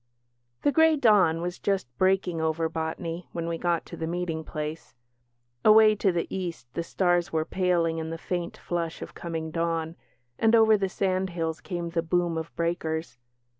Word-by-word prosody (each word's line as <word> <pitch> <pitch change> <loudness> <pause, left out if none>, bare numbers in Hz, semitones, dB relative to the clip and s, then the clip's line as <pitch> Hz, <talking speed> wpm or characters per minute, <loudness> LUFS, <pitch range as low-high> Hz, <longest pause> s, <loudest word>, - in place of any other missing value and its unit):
The 290 - +4
grey 320 +1 +5
dawn 200 - +4
was 180 +1 -4
just 195 -7 0
breaking 185 -3 +2
over 160 +1 0
Botany 165 +2 -4
when 170 -1 -3
we 165 -1 -3
got 175 -1 0
to - - -9
the 160 - -4
meeting 170 -2 -2
place. 155 -2 -6 0.7
Away 215 0 +7
to 195 -2 +2
the 170 -1 -1
East 175 -8 -4
the - - -2
stars 175 0 +1
were 160 -1 0
paling 170 -3 +1
in 160 0 -4
the 165 - -4
faint 175 +1 -4
flush 170 -2 -3
of - - -10
coming 160 -2 -5
dawn, 165 0 -1 0.4
and 225 +1 +5
over 220 -1 +6
the 195 -2 0
sandhills 185 -4 -1
came 175 -3 -4
the 165 0 0
boom 170 0 0
of 160 0 -4
breakers. 160 -5 -2
170 Hz, 170 wpm, -27 LUFS, 165-185 Hz, 0.7 s, Away